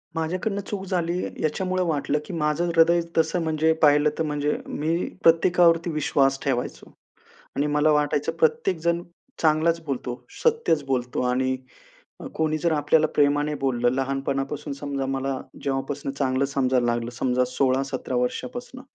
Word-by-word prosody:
माझ्याकडनं 185 +5 -2
चूक 200 -2 -4
झाली, 175 -1 -1 0.2
याच्यामुळं 185 +4 0
वाटलं, 150 -1 0
की 190 - -8
माझं 155 +1 0
हृदय 170 +1 +5 0.2
तसं 160 +2 +2
म्हणजे 160 0 +2
पाहिलं 150 0 +5
तर, 160 - 0
म्हणजे 150 -1 -1
मी 160 +3 -1 0.3
प्रत्येकावरती 170 0 +4
विश्वास 135 -3 +1
ठेवायचो 125 -3 -3 0.6
आणि 145 +1 +1
मला 155 +1 +4
वाटायचं, 150 -1 +1
प्रत्येकजण 180 - +1 0.4
चांगलंच 165 +1 +2
बोलतो, 125 -3 -4 0.2
सत्यचं 455 - +2
बोलतो 125 -2 -1
आणि 130 +1 0 0.6
अ, - - -7
कोणी 155 0 0
जर 170 +1 +1
आपल्याला 155 +1 +3
प्रेमाने 145 +1 +2
बोललं, 120 -2 +2
लहानपणापासून 135 +2 -2
समजा 140 -1 -3
मला 135 0 -2 0.2
जेव्हापासून 135 0 -3
चांगलं 135 -1 0
समजायला 130 -3 +1
लागलं, 120 0 -1
समजा 125 +1 +1
16-17 130 0 -1
वर्षापासून. 245 - -3
150 Hz, 135 wpm, -24 LUFS, 135-165 Hz, 0.6 s, हृदय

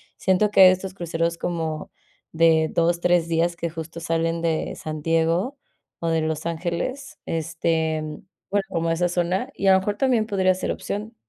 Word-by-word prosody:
siento 195 +2 +2
que 195 - +5
hay 185 - +10
estos 185 +1 -3
cruceros 170 -2 -2
como 160 -3 -3 0.4
de 160 -1 +4
2, 170 +1 +2
3 175 -1 +2
días 170 +1 +1
que, 170 0 -3
justo, 165 +1 -7
salen 165 0 -1
de 165 -1 -1
San 155 -1 -6
Diego 165 - +1 0.4
o 165 - -1
de 165 -1 +1
Los 155 0 -2
Ángeles, 175 - -3
este, 160 -1 -1 0.5
bueno, 200 0 +2
como 165 -3 -1
esa 175 +2 +1
zona, 175 +2 -1
y - - -3
a 190 - +8
lo 190 - +5
mejor, 205 +2 -2
también 245 -5 +2
podría 190 -3 +2
ser 185 - -3
opción. 215 +3 -5
170 Hz, 175 wpm, -23 LUFS, 165-185 Hz, 0.5 s, hay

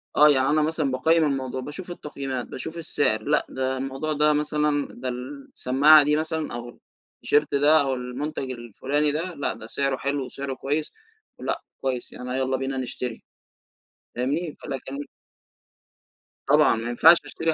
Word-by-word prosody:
آه 150 0 +7
يعني 135 -1 +3
أنا 155 +1 +3
مثلًا 155 -3 0
باقيِّم 160 +5 +3
الموضوع، 130 -3 -1
باشوف 175 +7 -7
التقييمات، 135 -6 -5
باشوف 160 +6 -7
السعر 145 -9 0
لأ، 150 +1 +1
ده 130 0 -2
الموضوع 135 +4 -3
ده 150 +1 +3
مثلًا 150 -1 0
ده 130 - -5
السماعة 140 +3 +3
دي 150 +1 +2
مثلًا 160 -2 -2
أو 120 0 -6 0.5
الT-shirt 150 +1 +4
ده 145 +2 +5
أو 135 -1 0
المُنتَج 130 +2 -4
الفلاني 130 +5 -1
ده 170 +4 -3
لأ، 140 - -1
ده 110 - -10
سعره 135 +1 -1
حلو 140 -1 -2
وسعره 135 +1 -5
كويس 145 +4 -2 0.5
لأ، - - -2 0.2
كويس 130 -2 -2
يعني 125 +1 -5
يلّا 130 0 0
بينا 135 0 -3
نشتري 125 -2 -5 0.9
فاهمني؟ 145 +6 -1
فلكن 135 0 -5 1.5
طبعًا 145 -3 +5
ما 115 +1 -4
ينفعش 165 +8 +7
أشتري 160 0 -1
140 Hz, 150 wpm, -25 LUFS, 130-150 Hz, 1.5 s, آه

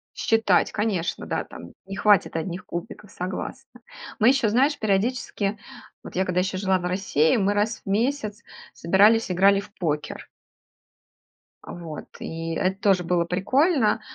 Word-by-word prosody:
Считать, 225 -5 +2
конечно, 200 -5 -2
да, - - -2
там 85 - -12
не 195 0 -7
хватит 205 -4 +3
одних 170 +2 -4
кубиков, 180 +3 -7
согласна. 245 +8 -6 0.4
Мы 225 +2 +6
ещё, 260 -5 +3
знаешь, 275 +7 +2
периодически, 210 0 -1 0.5
вот - - -10
я, 190 +1 +1
когда 180 -1 0
ещё 190 0 -2
жила 190 -1 +1
в 175 - -6
России, 180 -2 +1
мы 200 0 +1
раз 210 +2 -1
в - - -6
месяц 215 0 -1 0.3
собирались, 205 +4 +3
играли 195 +2 +4
в 200 - -10
покер. 150 -4 -3 1.4
А, - - -9
вот, 165 -3 -8
и 165 0 -5
эт 190 0 -1
тоже 190 -3 +3
было 170 0 +1
прикольно, 225 - +2
195 Hz, 150 wpm, -24 LUFS, 180-220 Hz, 1.4 s, Мы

